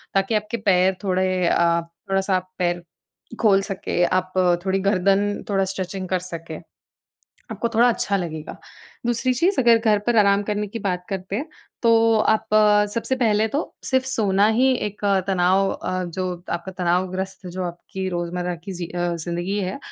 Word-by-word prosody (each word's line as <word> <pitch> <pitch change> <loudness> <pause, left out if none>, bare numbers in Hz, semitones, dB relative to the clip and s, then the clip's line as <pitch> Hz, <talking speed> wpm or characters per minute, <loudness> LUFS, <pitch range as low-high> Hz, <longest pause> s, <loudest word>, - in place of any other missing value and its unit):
ताकि 195 +3 +2
आपके 215 +2 -1
पैर 185 0 +4
थोड़े 185 -1 +1
अ, 170 0 +3 0.3
थोड़ा-सा 195 0 +1
आप 185 0 -7
पैर 175 -1 0 0.6
खोल 200 -3 +5
सके, 185 -2 -1
आप 185 0 -1 0.3
थोड़ी 190 0 +1
गर्दन 200 +1 +1
थोड़ा 195 -1 +2
स्ट्रेचिंग 190 0 -4
कर 185 - +1
सके, 165 -2 -7 1.0
आपको 235 - -2
थोड़ा 235 +2 +5
अच्छा 205 -4 0
लगेगा। 160 -4 -5 0.5
दूसरी 240 +2 +1
चीज़ 355 +8 +2
अगर 235 -2 +5
घर 220 -2 +2
पर 240 -1 +2
आराम 200 -1 +4
करने 210 0 -1
की 230 - -6
बात 180 -3 -2
करते 190 0 -3
हैं, 295 +8 -4 0.3
तो 230 -1 +4 0.2
आप 220 - -1 0.5
सबसे 245 +3 -1
पहले 220 -3 +2
तो 280 +7 -1 0.2
सिर्फ 260 -1 +1
सोना 205 -6 +2
ही 260 +1 +4 0.2
एक 205 +1 -11 0.2
तनाव 190 +1 +3
अ, 185 0 -3
जो 180 0 -4
आपका 170 +2 -4
तनावग्रस्त 185 +1 -2
जो 180 +1 -5
आपकी 180 +2 -5
रोज़मर्रा 175 0 -3
की 195 - -5
ज़ि 175 -1 -5
अ, 175 0 -2
ज़िंदगी 175 +4 -3
है, 185 +5 -3
190 Hz, 165 wpm, -22 LUFS, 180-210 Hz, 1.0 s, खोल